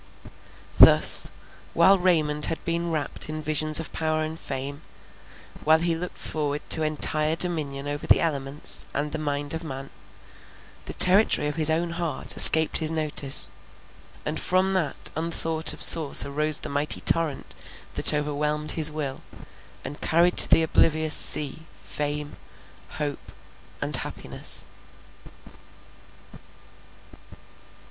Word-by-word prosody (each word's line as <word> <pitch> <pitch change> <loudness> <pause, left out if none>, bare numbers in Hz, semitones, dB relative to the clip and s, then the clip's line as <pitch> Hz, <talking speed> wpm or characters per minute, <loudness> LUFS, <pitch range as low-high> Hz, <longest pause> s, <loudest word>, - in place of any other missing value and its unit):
Thus, - - +6 0.5
while 190 +3 +3
Raymond 155 -5 0
had 165 - -6
been 170 0 -3
wrapt 155 -2 -2
in 155 0 -6
visions 155 0 +2
of 160 - -7
power 155 0 -3
and 160 +1 -8
fame, 140 +2 -7 0.8
while 155 +1 +3
he 170 +1 -1
looked 175 +2 -8
forward 150 -1 -5
to 160 - +7
entire 155 0 -1
dominion 150 -5 -2
over 145 0 -6
the - - +4
elements 140 -3 -2
and 145 +1 -4
the - - -5
mind 145 -1 -5
of 160 +1 -7
man, 135 -3 -9 0.9
the - - -8
territory 185 -4 +4
of 150 - -5
his 160 -1 +1
own 165 +2 -2
heart 170 -2 -4
escaped 160 0 +6
his 160 -2 +1
notice; 155 -3 +1 0.7
and 150 - -4
from 185 +1 -1
that 170 -7 -4
unthought 160 0 -2
of - - -7
source 155 -4 +5
arose 150 +2 0
the - - -7
mighty 145 +2 0
torrent 165 -4 -1 0.4
that - - +1
overwhelmed 150 0 -3
his 160 -1 +1
will, 145 -3 -7 0.6
and 145 - -9
carried 170 +2 +1
to - - +7
the 165 - +3
oblivious 155 -1 +1
sea, 150 +2 +2
fame, 145 +9 -5 0.6
hope, 145 -2 -7 0.5
and - - -2
happiness. - - -2
155 Hz, 130 wpm, -23 LUFS, 145-165 Hz, 0.9 s, to